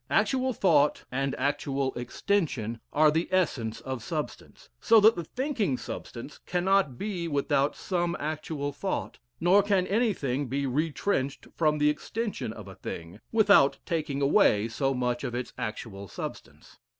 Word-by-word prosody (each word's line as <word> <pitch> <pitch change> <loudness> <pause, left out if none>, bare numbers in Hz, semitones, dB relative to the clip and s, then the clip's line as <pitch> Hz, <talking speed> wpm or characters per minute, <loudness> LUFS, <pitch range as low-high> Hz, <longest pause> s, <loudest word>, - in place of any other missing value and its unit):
Actual 260 -1 +2
thought 155 - +3
and 135 +1 -1
actual 140 0 -1
extension 120 - -1
are 155 +1 +5
the 160 +3 0
essence 125 -12 0
of 130 -3 -5
substance, 150 +5 -6
so 225 -2 +6
that 220 +2 +6
the 170 - -3
thinking 230 - -1
substance 120 +4 -8
cannot 180 -6 +2
be 185 -3 -3
without 145 -1 +1
some 175 -2 -1
actual 150 -1 -3
thought, 190 +6 -3 0.2
nor 180 +4 +5
can 195 -2 +2
anything 180 - 0
be 140 +3 -1
retrenched 140 +1 -1
from 155 -2 +2
the 150 0 +4
extension 215 - -4
of 105 -3 -10
a 95 - -9
thing, 85 -1 -8
without 200 -11 +5
taking 150 -5 -1
away 140 - +4
so 135 +4 -1
much 125 -1 -1
of 120 - -3
its 125 0 -4
actual 100 -2 -5
substance. - - -9
150 Hz, 145 wpm, -28 LUFS, 130-185 Hz, 0.2 s, so